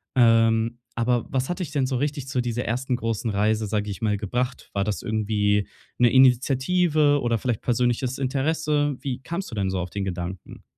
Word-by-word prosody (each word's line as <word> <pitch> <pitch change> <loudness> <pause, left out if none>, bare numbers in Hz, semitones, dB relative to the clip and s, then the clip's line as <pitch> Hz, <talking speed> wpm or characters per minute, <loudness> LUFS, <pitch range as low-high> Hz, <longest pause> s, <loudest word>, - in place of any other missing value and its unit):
Ähm, 115 -1 +3 0.2
aber 120 0 +1
was 130 +2 -1
hat 180 - -3
dich 165 -5 -4
denn 140 -4 +1
so 130 -2 -1
richtig 140 -1 -2
zu 130 - -1
dieser 120 0 -2
ersten 125 +2 -1
großen 115 -1 -2
Reise, 105 +1 +1
sage 105 0 -1
ich 95 - -7
mal, 105 -2 +1
gebracht? 125 +5 -3
War 100 0 0
das 105 -2 -2
irgendwie 105 -2 0 0.3
'ne 120 -1 +5
Initiative 145 +4 +3
oder 120 -1 +1
vielleicht 120 -1 -2
persönliches 125 +1 0
Interesse? 145 +2 0
Wie 130 -3 -3
kamst 170 -2 -5
du - - -6
denn 95 -2 0
so 95 -1 -2
auf 90 0 -4
den 100 +1 -3
Gedanken? 90 0 -6
120 Hz, 190 wpm, -24 LUFS, 110-135 Hz, 0.3 s, ne